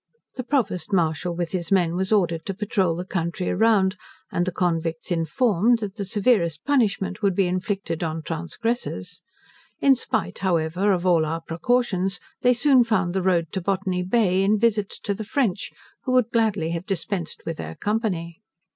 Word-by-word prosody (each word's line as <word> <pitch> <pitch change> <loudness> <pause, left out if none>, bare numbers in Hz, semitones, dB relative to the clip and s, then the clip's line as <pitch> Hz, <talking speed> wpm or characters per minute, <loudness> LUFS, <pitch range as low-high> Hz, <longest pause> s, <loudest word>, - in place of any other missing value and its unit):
The 255 - -4
Provost 240 -9 -1
Martial 170 -1 0
with 170 -1 -3
his 175 -2 -3
men 175 -3 +3
was 190 +2 -1
ordered 170 -6 +2
to 195 - -3
patrole 190 -4 0
the 180 +2 -5
country 175 0 -2
around, 205 -2 +3 0.3
and 175 +1 0
the - - 0
convicts 165 -1 -2
informed, 215 +5 +2
that 210 -4 -5
the 205 -2 -5
severest 190 -6 +1
punishment 210 -9 +1
would 200 -3 +2
be 195 - +3
inflicted 185 -2 -2
on 160 -1 -3
transgressors. 200 +10 -3 0.6
In 275 - +5
spite, 255 - -2
however, 180 +2 +1
of 180 -1 0
all 170 -3 +4
our 165 +2 -2
precautions, 190 +1 0 0.2
they 250 0 +4
soon 260 0 +5
found 195 -6 0
the 190 - 0
road 170 -4 +1
to 190 - -3
Botany 185 0 -1
Bay, 185 -1 +2
in 205 +2 +3
visits 210 -2 +1
to 200 - -1
the 220 - -5
French, 215 -3 -1 0.4
who 255 - 0
would 250 -2 +3
gladly 210 -8 +1
have 170 +2 -4
dispensed 185 -2 -3
with 165 - -4
their 80 +1 -6
company. 200 -5 -2
190 Hz, 175 wpm, -24 LUFS, 170-215 Hz, 0.6 s, In